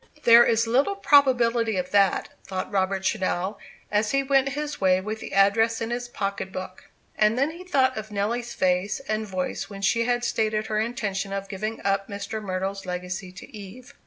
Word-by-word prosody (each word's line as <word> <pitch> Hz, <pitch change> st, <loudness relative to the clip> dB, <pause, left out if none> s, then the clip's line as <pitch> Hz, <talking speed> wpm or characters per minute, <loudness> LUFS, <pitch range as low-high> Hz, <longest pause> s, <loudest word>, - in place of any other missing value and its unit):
"There 235 Hz, 0 st, +8 dB
is 230 Hz, 0 st, +2 dB
little 270 Hz, +12 st, +2 dB
probability 245 Hz, -, +3 dB
of 180 Hz, 0 st, -3 dB
that," 200 Hz, -1 st, +3 dB
thought 190 Hz, -1 st, -5 dB
Robert 190 Hz, -1 st, 0 dB
Channell, 190 Hz, -1 st, -1 dB, 0.3 s
as 210 Hz, 0 st, +1 dB
he 275 Hz, +2 st, +1 dB
went 270 Hz, 0 st, +2 dB
his 295 Hz, -3 st, -4 dB
way 185 Hz, -1 st, +4 dB
with 215 Hz, +3 st, -5 dB
the -, -, -8 dB
address 225 Hz, +4 st, +3 dB
in 230 Hz, 0 st, -3 dB
his 245 Hz, 0 st, -3 dB
pocket 200 Hz, -4 st, -4 dB
book. 185 Hz, 0 st, -7 dB, 0.3 s
And 215 Hz, +2 st, +2 dB
then 280 Hz, +4 st, +1 dB
he 345 Hz, +3 st, -10 dB
thought 265 Hz, -8 st, +2 dB
of 215 Hz, 0 st, -6 dB
Nelly's 225 Hz, +4 st, -2 dB
face 185 Hz, +2 st, +1 dB
and 215 Hz, -4 st, -3 dB
voice 185 Hz, -1 st, -3 dB
when 200 Hz, -1 st, -8 dB
she 230 Hz, +4 st, +2 dB
had 245 Hz, 0 st, 0 dB
stated 215 Hz, -2 st, 0 dB
her 215 Hz, -1 st, -1 dB
intention 210 Hz, -4 st, -2 dB
of 195 Hz, 0 st, -4 dB
giving 215 Hz, +3 st, -4 dB
up 195 Hz, 0 st, +1 dB
Mr. 200 Hz, +2 st, -5 dB
Myrtle's 190 Hz, 0 st, -4 dB
legacy 180 Hz, +1 st, -5 dB
to 200 Hz, +7 st, -12 dB
Eve. 230 Hz, +7 st, -11 dB
215 Hz, 190 wpm, -25 LUFS, 195-240 Hz, 0.3 s, There